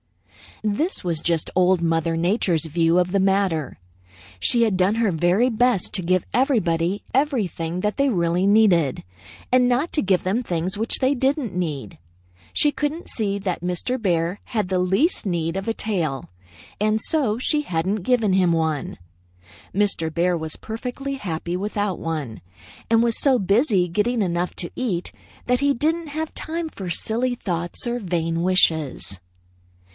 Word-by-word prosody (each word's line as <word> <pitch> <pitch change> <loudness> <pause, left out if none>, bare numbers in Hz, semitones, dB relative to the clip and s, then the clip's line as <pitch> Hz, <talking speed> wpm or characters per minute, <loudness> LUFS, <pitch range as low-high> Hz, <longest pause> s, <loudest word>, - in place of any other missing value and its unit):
"This 220 - -1
was 170 -3 -1
just 165 -2 0
Old 185 -1 +3
Mother 165 0 +1
Nature's 175 -2 +1
view 165 +2 +2
of 180 0 +1
the 200 - +2
matter. 190 - +1 0.6
She 235 - +3
had 215 -5 +1
done 190 +3 +2
her 225 -3 +2
very 175 +9 +2
best 235 -4 +1
to 190 - -1
give 185 +1 +1
everybody 195 - +1
everything 205 - 0
that 210 +1 -1
they 280 0 +3
really 175 -3 +1
needed, 195 -9 +3 0.5
and 250 0 +5
not 255 +7 +1
to 300 - +2
give 190 -2 +2
them 195 +7 0
things 180 0 -2
which 225 +2 0
they 265 +1 +3
didn't 265 - 0
need. 150 - -4 0.5
She 295 - +3
couldn't 295 +4 -3
see 200 -3 -1
that 185 -4 -3
Mr. 180 +8 -2
Bear 175 -1 0
had 210 -6 -2
the 185 -1 +1
least 195 - +1
need 170 -3 -1
of 195 +2 -4
a 225 - +1
tail, 170 -12 -2 0.5
and 215 +1 +2
so 265 -10 0
she 300 +4 +1
hadn't 185 - -1
given 225 -4 +2
him 185 -2 +3
one. 160 -3 -1 0.8
Mr. 195 -5 0
Bear 175 +2 +2
was 160 -1 -4
perfectly 250 +5 -5
happy 175 -7 -4
without 205 0 -2
one, 150 -9 -4 0.5
and 225 0 +4
was 235 -1 +2
so 270 -3 +4
busy 200 -2 +2
getting 215 +7 0
enough 175 -1 -1
to 175 - -3
eat 195 -9 -2 0.3
that 250 0 +2
he 280 0 +3
didn't 320 +5 0
have 310 +2 -4
time 325 0 -4
for 190 - -7
silly 235 +8 0
thoughts 175 -5 -4
or 240 +1 -1
vain 165 -4 -1
wishes. 160 - +1
195 Hz, 160 wpm, -23 LUFS, 170-240 Hz, 0.8 s, and